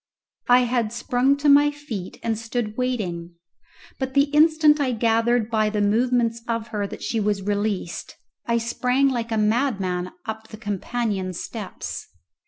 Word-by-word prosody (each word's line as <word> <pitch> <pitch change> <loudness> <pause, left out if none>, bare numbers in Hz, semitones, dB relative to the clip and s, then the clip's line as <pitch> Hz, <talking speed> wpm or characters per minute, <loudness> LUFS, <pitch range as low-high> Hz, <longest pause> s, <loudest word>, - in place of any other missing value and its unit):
I 245 +1 +7
had 240 -3 0
sprung 245 +3 +1
to 290 +1 0
my 290 +1 +7
feet 290 -11 -7
and 225 -1 0
stood 225 -1 -3
waiting. 185 -10 -3 0.6
But 265 0 -3
the 280 +1 +3
instant 310 0 +5
I 265 -3 +1
gathered 230 0 +1
by 215 -1 +2
the 210 0 -2
movements 230 +2 +2
of 230 -1 -2
her 205 -2 -2
that - - -9
she 225 - -1
was 205 -2 0
released 205 -3 -2 0.3
I 235 0 +2
sprang 250 +4 +1
like 235 -3 -3
a 225 - +1
madman 210 -5 0
up 220 -1 -6
the 215 - -10
companion 205 -2 -2
steps. 205 +2 -6
230 Hz, 155 wpm, -23 LUFS, 210-250 Hz, 0.6 s, I